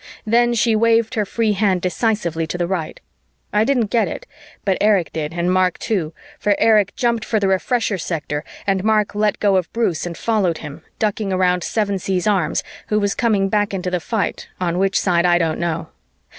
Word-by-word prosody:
Then 240 +2 +3
she 225 0 +2
waved 230 +1 +3
her 215 -4 0
free 225 +1 0
hand 195 -2 +1
decisively 180 -5 -1
to 175 - -4
the 175 - 0
right. 170 -3 -3 0.5
I 210 +1 +4
didn't 240 -4 +1
get 235 -2 +2
it, - - -6 0.4
but 190 -2 +1
Erich 205 -5 +2
did 155 -1 -3
and 175 +1 0
Mark 185 -1 +2
too, 180 -8 -2 0.3
for 205 0 +2
Erich 210 -3 +3
jumped 235 -3 0
for 220 0 0
the 200 - +1
Refresher 200 +2 0
sector 150 -3 -3 0.2
and 195 -1 0
Mark 215 -1 +2
let 210 0 0
go 200 -2 +3
of 180 -3 -2
Bruce 185 -8 0
and 170 - -6
followed 200 -8 0
him, 150 0 -9 0.2
ducking 210 -2 -1
around 180 -1 +2
Sevensee's 195 -4 -1
arms, 190 -7 +1 0.2
who 210 - +1
was 200 -1 0
coming 210 -5 +1
back 205 0 0
into 180 -1 -3
the 180 - 0
fight 215 +3 -2
on 175 -1 -1
which 195 0 +2
side 175 -2 +2
I 175 0 +4
don't 165 -2 0
know. 170 -2 -2
195 Hz, 195 wpm, -20 LUFS, 180-215 Hz, 0.5 s, I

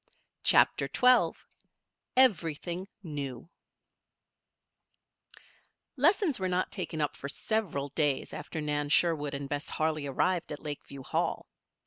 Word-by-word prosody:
CHAPTER - - +4
XII 250 0 +5 0.8
EVERYTHING 180 - +2 0.2
NEW 145 -3 -6 2.4
Lessons 320 - +3
were 185 -1 0
not 180 0 0
taken 160 - -4
up 150 - 0
for 140 - -6
several 160 -7 -2
days 145 -1 0
after 160 - -5
Nan 145 -1 -1
Sherwood 150 -3 +2
and 140 0 -4
Bess 145 +1 -4
Harley 155 -2 -1
arrived 175 +6 0
at 150 - -6
Lakeview 145 -2 -6
Hall. - - -1
155 Hz, 110 wpm, -30 LUFS, 145-185 Hz, 2.4 s, XII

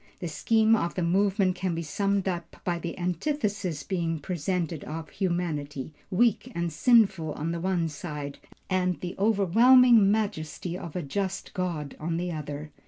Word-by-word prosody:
The 175 - -4
scheme 220 +7 +3
of 170 -5 -1
the 180 - -1
movement 190 +2 +2
can 180 -2 -2
be 165 - -3
summed 195 +5 0
up 170 -2 -4
by 175 -1 -1
the 170 0 -5
antithesis 185 - -2
being 170 -4 -1
presented 170 0 -2
of 160 +1 -6
humanity, 155 -6 -2 0.2
weak 225 +3 +2
and 170 -2 -2
sinful 195 -6 +3
on 160 +3 -3
the 170 - -3
one 180 -2 +1
side, 150 -2 -6 0.3
and 185 -1 0
the 180 -1 -4
overwhelming 225 +2 +6
majesty 190 -5 -2
of 170 -4 -7
a 180 - -2
just 190 +6 -3
God 170 -7 -3
on 165 +1 -2
the 175 +1 -2
other. 150 -1 -6
180 Hz, 160 wpm, -27 LUFS, 160-195 Hz, 0.3 s, overwhelming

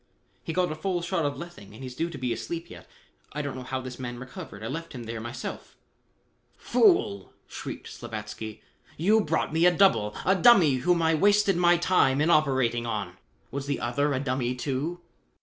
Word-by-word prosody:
"He - - -4
got 180 0 +1
a - - -3
full 175 +1 -2
shot 170 -3 0
of 140 - -4
lethane 170 - -10
and 130 - -10
he's 130 -1 -6
due 165 +6 -2
to 160 - -8
be 125 -3 -1
asleep 165 +10 -6
yet. - - -12 0.4
I 150 0 -3
don't 140 -2 -4
know 130 - -6
how 130 +1 -4
this 130 0 -8
man 120 -2 -5
recovered. 120 -5 -9
I - - -3
left 165 +6 -5
him 125 -3 -7
there 115 0 -5
myself." 120 +3 -7 0.8
"Fool!" 225 - +2
shrieked - - -7
Slavatsky. 110 -1 -7 0.4
"You 210 +7 +4
brought 160 0 -1
me 165 +2 +5
a - - +6
double, 175 - +3
a 190 - +4
dummy 185 - +6
whom 170 +6 +2
I 160 0 +3
wasted 205 +3 +4
my 175 0 +4
time 170 -6 +3
in 155 +3 +3
operating 130 -6 +2
on. 100 -5 -4 0.3
Was 140 0 -4
the 140 -2 -1
other 145 +6 0
a 130 - 0
dummy, 130 -2 -1
too?" 140 +7 -3
140 Hz, 195 wpm, -27 LUFS, 120-170 Hz, 0.8 s, a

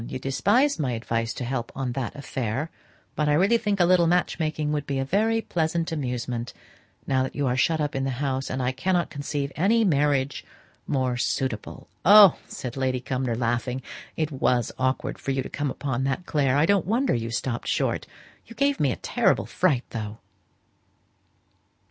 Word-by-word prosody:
You - - -4
despised 205 - +2
my 130 -5 0
advice 115 0 -2
to - - -4
help 120 -1 -3
on 130 -2 -2
that 130 +2 -4
affair, 135 +1 -3 0.4
but 150 -1 +1
I - - +4
really 195 +9 +4
think 205 -3 -1
a 175 - +5
little 175 -1 +4
match 175 0 +1
making 155 -1 -1
would 145 -1 -2
be 140 - -1
a 135 - -1
very 220 +8 +1
pleasant 165 0 -1
amusement 125 -5 -3 0.5
now 130 -1 +1
that 130 - -3
you 145 - 0
are 125 -1 +1
shut 160 +5 +2
up 150 -2 -1
in 135 - -1
the 135 - 0
house; 135 -1 -2
and 130 0 -2
I 125 - +1
cannot 175 +6 0
conceive 140 -1 -3
any 215 +9 +3
marriage 145 -5 +1 0.4
more 130 -3 0
suitable.'" 125 -3 -2 0.2
"Oh!" 200 0 +8
said 125 -2 -6
Lady 130 -1 0
Cumnor, 130 -1 -2
laughing, 120 +2 -1 0.3
"it 155 -1 -1
was 125 -4 +1
awkward 130 +1 -1
for - - -6
you 135 -1 0
to - - -7
come 145 -1 -2
upon 130 -1 -2
that, 135 +6 -2
Clare: 140 -3 +1
I 150 - +4
don't 195 -2 +2
wonder 245 +6 +2
you 115 -1 -2
stopped 120 +1 -3
short. - - 0 0.4
You 230 - -12
gave 280 +3 +1
me 140 -3 +2
a - - -2
terrible - - +1
fright, 145 -9 +1
though." 110 -1 -5
135 Hz, 185 wpm, -25 LUFS, 125-165 Hz, 0.5 s, Oh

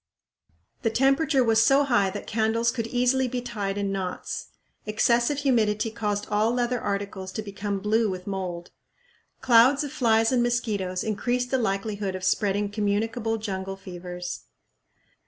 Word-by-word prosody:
The 225 - +1
temperature 270 +3 +3
was 225 -1 +4
so 275 +5 +5
high 240 -8 +2
that 200 +2 -6
candles 225 +2 +1
could 230 -3 -3
easily 250 +2 +2
be 250 0 -3
tied 210 -5 -4
in 200 -1 -1
knots. 190 -2 -4 0.4
Excessive 235 +5 +2
humidity 225 -6 +1
caused 210 -2 -2
all 215 +2 +2
leather 245 -1 0
articles 200 -2 -3
to 220 - -4
become 200 0 -4
blue 215 +2 +1
with 185 -1 -5
mould. 180 -3 -5 0.7
Clouds 260 +4 +5
of 290 - -5
flies 225 -2 +3
and 250 -2 +3
mosquitoes 210 -7 -1
increased 245 +4 -1
the 265 - +2
likelihood 200 -2 -2
of 185 - -6
spreading 205 +1 +1
communicable 225 +2 -1
jungle 195 -3 -4
fevers. 180 -2 -7
220 Hz, 145 wpm, -26 LUFS, 200-240 Hz, 0.7 s, so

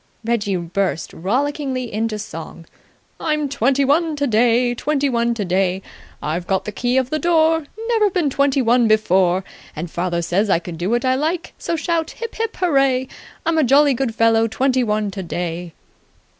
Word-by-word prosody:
Reggie 210 -4 0
burst 175 -1 -2
rollickingly 255 - -2
into 220 0 -1
song. 165 -4 -8 0.5
"I'm 305 -2 0
twenty 275 +1 +1
one 315 +3 +2
today! 240 -2 +2
Twenty 285 +3 0
one 235 -1 +1
today! 190 -2 0 0.4
I've 170 +4 -3
got 190 0 0
the 210 - -4
key 245 +4 0
of 260 -1 0
the 310 - 0
door! 325 -1 +2 0.2
Never 440 -3 +3
been 350 -7 0
twenty 280 0 +2
one 240 0 +3
before! 190 -4 +3 0.3
And 165 +2 -5
father 175 -1 -1
says 195 +5 0
I 190 - +4
can 170 0 -7
do 175 +4 -3
what 240 +2 +1
I 255 - +3
like! 315 +6 -2
So 340 - -2
shout 330 0 -1
Hip 465 - -5
hip 455 0 -3
hooray! 270 -7 +2 0.4
I'm 325 0 +2
a - - +4
jolly 280 +2 +5
good 240 -3 -2
fellow, 225 0 +3
Twenty 255 +3 +1
one 210 -2 -1
today." 175 -2 -4
240 Hz, 170 wpm, -20 LUFS, 195-285 Hz, 0.5 s, jolly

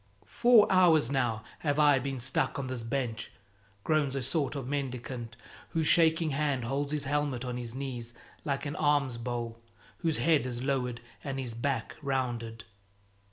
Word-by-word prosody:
"Four 235 -3 +6
hours 165 -8 +5
now 120 -5 0 0.2
have 145 -2 0
I 145 -3 +5
been 135 0 -3
stuck 125 +2 0
on 140 - -2
this 130 -2 -4
bench," 115 -1 -3 0.5
groans 150 -4 +1
a 135 - -2
sort 140 +2 0
of 135 -3 -4
mendicant, 125 -4 -4 0.3
whose 160 -1 0
shaking 160 0 +4
hand 140 -3 0
holds 140 +4 -1
his 150 -2 0
helmet 140 -3 -1
on 125 -1 -3
his 120 -1 -5
knees 120 -3 -4 0.3
like 140 0 -2
an 145 - -3
alms 145 -5 +2
bowl, 115 -1 -4 0.4
whose 160 -2 0
head 155 -6 +3
is 120 0 -4
lowered 125 -3 -1 0.2
and 135 -1 -3
his 125 -4 -2
back 120 0 -2
rounded. 120 -5 -2
135 Hz, 160 wpm, -30 LUFS, 120-145 Hz, 0.5 s, Four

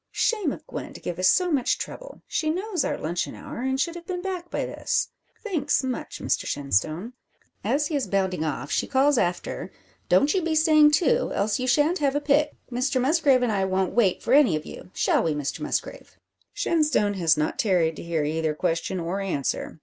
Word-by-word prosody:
Shame 420 -10 +1
of - - -8
Gwen - - -7
to - - -10
give 175 0 -5
us 185 - +3
so 360 - +3
much 270 -5 +1
trouble! - - -8
She 310 - -1
knows 370 +3 -1
our - - -1
luncheon 170 +3 -3
hour, - - -8
and 265 +1 -1
should 335 +4 0
have 345 0 -10
been 360 -1 -4
back 365 -2 -4
by - - -2
this. - - -1 0.3
Thanks, 365 -10 0
much, 260 -1 -4
Mr - - -1
Shenstone." 155 - -1 0.5
As 295 +2 +1
he 305 - -2
is 280 - -1
bounding 190 -4 0
off, 145 -2 -3
she - - 0
calls 275 -1 +3
after 175 0 -2 0.4
"Don't 285 +1 +4
you 380 - +1
be 325 -1 -1
staying 310 -1 +6
too, 370 - +2
else 210 +5 0
you 255 - -2
shan't 295 +8 +3
have 280 -1 +1
a - - +2
pick. 295 +1 +2 0.2
Mr 255 +2 0
Musgrave 275 -1 +3
and 240 - +1
I 195 -2 +1
won't 190 0 0
wait 210 -7 +2
for 240 - +1
any 275 - +6
of 155 - -4
you. - - -10
Shall - - +2
we, 160 -2 0
Mr 145 -2 -3
Musgrave?" - - -4 0.3
Shenstone 300 -11 +1
has 160 -3 +3
not 155 0 -1
tarried 175 -6 +2
to - - -7
hear 170 -2 -1
either 155 +1 -1
question 165 +4 -1
or 175 +3 -3
answer. 160 -4 -3
255 Hz, 205 wpm, -25 LUFS, -, 0.5 s, staying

